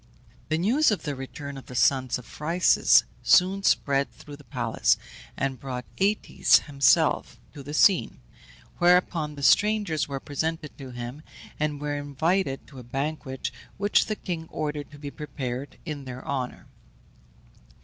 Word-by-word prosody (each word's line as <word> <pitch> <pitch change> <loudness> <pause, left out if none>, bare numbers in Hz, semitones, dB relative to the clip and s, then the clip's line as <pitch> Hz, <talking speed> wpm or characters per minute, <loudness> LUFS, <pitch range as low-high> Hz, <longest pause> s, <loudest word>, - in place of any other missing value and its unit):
The 155 - +1
news 240 - +3
of 210 - -1
the 145 - -2
return 140 +1 -7
of - - -16
the 125 - -9
sons 130 0 +2
of 125 - -11
Phryxus 170 +4 +4 0.2
soon 190 +2 +4
spread 140 -7 +2
through 145 - -12
the 145 - -16
palace, 115 - +1 0.4
and 135 -2 -2
brought 125 -1 -5
Aëtes 205 +2 +3
himself 140 -2 +2
to 145 - -9
the 145 +2 -6
scene, 190 +2 +4 0.6
whereupon 175 -4 +3
the 140 - -8
strangers 205 -4 +3
were 140 -1 -4
presented 155 +2 -3
to 135 -2 -8
him, 120 +3 -7 0.4
and 150 -1 -1
were 145 0 -2
invited 145 +1 -1
to 135 -3 -12
a - - -9
banquet 135 +1 -4 0.3
which 205 +1 +2
the 215 - -1
king 170 -5 -5
ordered 150 -2 -4
to 145 - -13
be 145 -1 -7
prepared 135 -3 -5
in 150 -4 -5
their 130 0 -8
honour. 130 -3 -3
145 Hz, 150 wpm, -26 LUFS, 135-165 Hz, 0.6 s, Phryxus